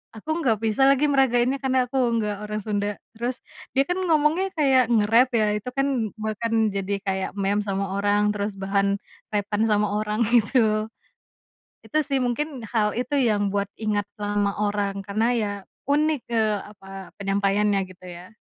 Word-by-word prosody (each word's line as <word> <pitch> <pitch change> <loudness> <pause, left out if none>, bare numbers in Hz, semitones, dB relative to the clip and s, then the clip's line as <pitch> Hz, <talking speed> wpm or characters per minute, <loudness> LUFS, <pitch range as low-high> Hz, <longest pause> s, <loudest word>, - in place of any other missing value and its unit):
Aku 315 +9 -3
nggak 235 -9 +2
bisa 225 +5 +3
lagi 275 +2 +4
meragainnya 265 -2 +2
karena 260 -2 +2
aku 255 +2 -4 0.2
nggak 210 -2 -1
orang 210 0 -3
Sunda. 205 -1 -1 0.2
Terus 240 +2 -3 0.4
dia 270 - +5
kan 360 +1 -2
ngomongnya 330 +2 +2
kayak 265 -6 +3
ngerap 230 +3 +4
ya, 215 -2 +3
itu 210 +4 -6
kan 270 -5 +1
bahkan 220 0 0
jadi 195 0 -2
kayak 190 -1 -1
meme 200 +1 +1
sama 195 -1 -2
orang, 205 +1 +2
terus 205 0 -3
bahan 200 +1 +1 0.3
rap-an 205 0 -1
sama 210 -1 +2
orang 210 +2 0
gitu. 215 -2 +3 1.0
Itu 310 - -2
sih 275 -2 -1
mungkin, 255 +1 -2
hal 210 -2 +1
itu 250 +4 -3
yang 210 -5 +1
buat 200 -1 0
ingat 210 -2 -1
sama 205 -1 -1
orang, 205 -1 -1
karena 210 +3 0
ya 215 -3 0 0.4
unik, 300 0 +1
eee, 220 -2 +2
apa, 195 -1 -11
penyampaiannya 200 +1 +1
gitu 185 0 -15
ya. 175 +3 -10
215 Hz, 160 wpm, -24 LUFS, 205-250 Hz, 1.0 s, dia